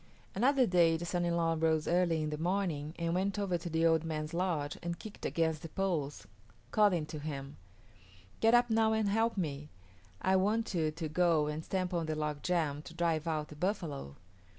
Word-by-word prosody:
Another 260 +5 +3
day 170 -4 +4
the 170 - -5
son 175 0 -1
in 170 0 +1
law 165 -1 +2
rose 160 -1 +1
early 170 -3 +2
in 155 - -2
the 150 - -3
morning 170 -4 -1
and 170 0 -1
went 195 +3 0
over 200 -3 0
to 175 - -5
the 165 +1 +1
old 165 -1 +4
man's 155 -1 -4
lodge 165 -5 -1
and 170 0 -3
kicked 215 -1 -6
against 160 -2 0
the 165 - -7
poles, 160 -6 -2 0.5
calling 200 -7 +3
to 155 0 -7
him, 140 -2 -6 0.8
"Get 225 +1 +5
up 240 -1 +3
now 220 0 +3
and 220 -1 +1
help 225 +2 +1
me; 150 -4 -3 0.5
I 190 0 +3
want 210 +4 +1
you 160 -3 +1
to 160 +1 -4
go 165 -1 +2
and 150 +1 -3
stamp 185 0 -2
on 170 -2 -1
the 155 - -1
log 150 -1 -2
jam 160 -5 0
to 165 - -12
drive 165 -2 0
out 155 -2 -1
the 150 - -10
buffalo." 150 - -3
165 Hz, 200 wpm, -32 LUFS, 155-185 Hz, 0.8 s, Get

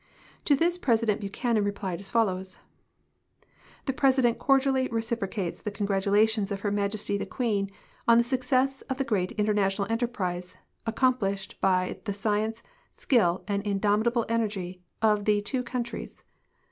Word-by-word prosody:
4'o 285 - +5
this 345 +4 +1
President 225 - +2
Buchanan 215 +2 0
replied 200 -3 -3
as 195 0 -5
follows: 190 -5 0 1.3
"The 270 - 0
President 260 -3 +3
cordially 270 -1 +3
reciprocates 225 -5 -3
the - - -3
congratulations 205 +1 +1
of 200 0 -3
Her 205 - -1
IMajesty 200 0 -1
the - - -4
Queen 210 -6 -1 0.4
on 235 0 +7
the 235 - +5
success 260 +2 0
of 265 - -1
the 270 - 0
great 200 -8 -1
international 205 -2 +1
enterprise 185 -7 -2 0.3
aci'om 255 +2 +2
plished 195 -1 -2
l)y 185 -1 +2
the 205 - -1
science, 215 +2 -1 0.3
skill, 190 - +2
and 200 -1 0
indomitable 210 +3 +1
enersry 200 -6 -2 0.2
of 210 -2 +3
the 210 -1 +3
two 230 +5 -1
countries. 240 -1 -5
215 Hz, 140 wpm, -27 LUFS, 200-240 Hz, 1.3 s, on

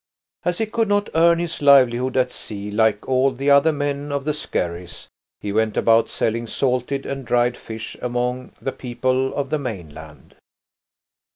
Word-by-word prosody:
As 175 0 -1
he 220 - 0
could 225 +1 0
not 205 0 +1
earn 170 +1 +5
his 170 -2 -4
livelihood 130 -2 +4
at 125 -1 +2
sea 105 -1 -6
like 105 -1 +1
all 130 +1 +3
the 135 +2 0
other 140 +3 +6
men 145 -1 -3
of 140 -1 -2
the 150 - 0
skerries, 85 - -4 0.3
he 100 - -3
went 110 0 +1
about 115 0 +4
selling 115 +1 -1
salted 130 +2 -1
and 135 0 -4
dried 120 0 +1
fish 110 0 -8
among 125 +1 -2
the 135 - -3
people 130 +1 -1
of 140 -1 -3
the 155 - +1
mainland. 80 - -8
130 Hz, 165 wpm, -22 LUFS, 115-140 Hz, 0.3 s, other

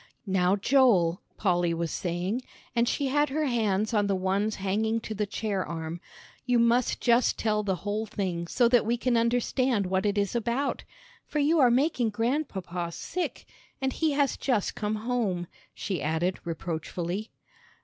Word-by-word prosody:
"Now, 190 -1 +2
Joel," 205 -7 +3 0.2
Polly 175 -4 +1
was 165 -1 -2
saying, 180 +7 -2 0.3
and 235 0 +3
she 285 - 0
had 290 +2 +2
her 305 +3 0
hands 215 -4 0
on 205 -2 +2
the 200 - +1
ones 195 +3 0
hanging 215 +4 0
to 220 - -5
the 210 0 -2
chair 200 -2 -2
arm, 165 0 -5 0.4
"you 250 -1 +2
must 235 +1 +3
just 240 0 +3
tell 215 -1 +1
the 195 -3 0
whole 210 +2 -1
thing 185 -5 -3
so 240 +6 +3
that 245 -1 +4
we 235 +2 0
can 245 0 +1
understand 235 -1 +1
what 190 +2 0
it 205 0 0
is 200 +2 0
about, 235 +4 -1 0.4
for - - -4
you 300 +3 +3
are 255 -3 +6
making 250 -1 +2
Grandpapa 205 - -2
sick, 355 - -4 0.3
and 265 -2 -1
he 315 -2 +1
has 280 -1 +1
just 240 -7 0
come 210 0 -2
home," 215 -6 -1 0.3
she 190 -4 -3
added, 160 +4 0
reproachfully. 170 +4 -4
215 Hz, 165 wpm, -28 LUFS, 185-245 Hz, 0.4 s, are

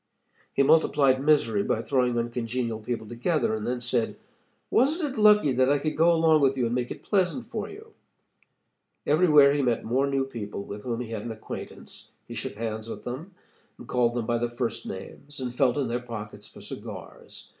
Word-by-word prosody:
He 140 - +2
multiplied 140 -3 +4
misery 140 -9 +3
by 110 +3 -1
throwing 125 -1 +1
uncongenial 115 -1 -2
people 110 0 -4
together 120 +4 0
and 110 -1 -3
then 125 0 -2
said: 120 -1 -1 0.5
'Wasn't 295 +2 +2
it 220 - -2
lucky 210 -8 +6
that 130 +1 +3
I 145 - +4
could 155 +2 -2
go 165 +2 +5
along 160 -2 +4
with 135 -1 +3
you 125 - +1
and 115 - -1
make 125 0 -1
it - - -8
pleasant 200 +4 +1
for 215 -3 -5
you?' 440 +2 -12 1.1
"Everywhere 150 -3 +6
he 145 - +1
met 120 -3 +1
more 130 +5 +1
new 135 -1 0
people 105 -6 -6
with 100 +1 -7
whom 120 +1 -3
he 115 -2 -6
had 110 -2 -3
an 115 - -5
acquaintance. 110 -1 -9
He - - -8
shook - - -4
hands 110 0 -4
with - - -7
them, 155 +10 -7 0.4
and - - -12
called 120 -1 +1
them 120 -2 -1
by 120 0 0
their 120 0 -1
first 120 -1 -3
names, 140 +9 -8
and 125 -2 -4
felt 125 0 +2
in 140 -3 0
their 120 +1 -1
pockets 105 -3 -7
for - - -14
cigars. - - -9
125 Hz, 200 wpm, -26 LUFS, 115-145 Hz, 1.1 s, lucky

